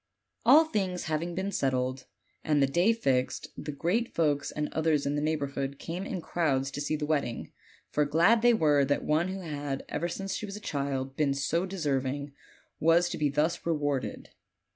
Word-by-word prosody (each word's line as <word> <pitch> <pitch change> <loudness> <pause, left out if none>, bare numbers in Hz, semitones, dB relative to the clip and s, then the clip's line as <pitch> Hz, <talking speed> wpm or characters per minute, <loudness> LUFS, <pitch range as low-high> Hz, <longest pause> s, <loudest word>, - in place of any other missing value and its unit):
All 320 +2 +8
things 190 - -2
having 165 +2 -2
been 190 +2 -2
settled, 130 -3 -1 0.4
and 150 -2 +2
the 140 - +5
day 175 +10 +3
fixed, 135 - 0
the 150 - -5
great 180 - -1
folks 145 -3 +1
and 150 0 -2
others 155 -3 +1
in 140 - 0
the 145 - -1
neighborhood 140 -3 -2
came 175 +7 -5
in 185 - -4
crowds 140 -6 0
to 145 - -4
see 150 +1 -1
the 150 -1 -2
wedding; 145 -6 -2 0.4
for 150 - +2
glad 170 +10 +4
they 240 0 +5
were 150 -7 +4
that 145 +1 0
one 155 +3 +2
who 190 +1 -4
had, 145 -4 -4
ever 170 - -1
since 195 +3 -4
she 210 - -4
was 200 - -7
a - - -6
child, 140 -6 -3
been 140 -2 +1
so 165 +7 0
deserving, 140 -5 -2 0.5
was 170 +2 +4
to - - -4
be 150 -1 +2
thus 150 +5 0
rewarded. 145 -5 -2
150 Hz, 185 wpm, -29 LUFS, 140-175 Hz, 0.5 s, All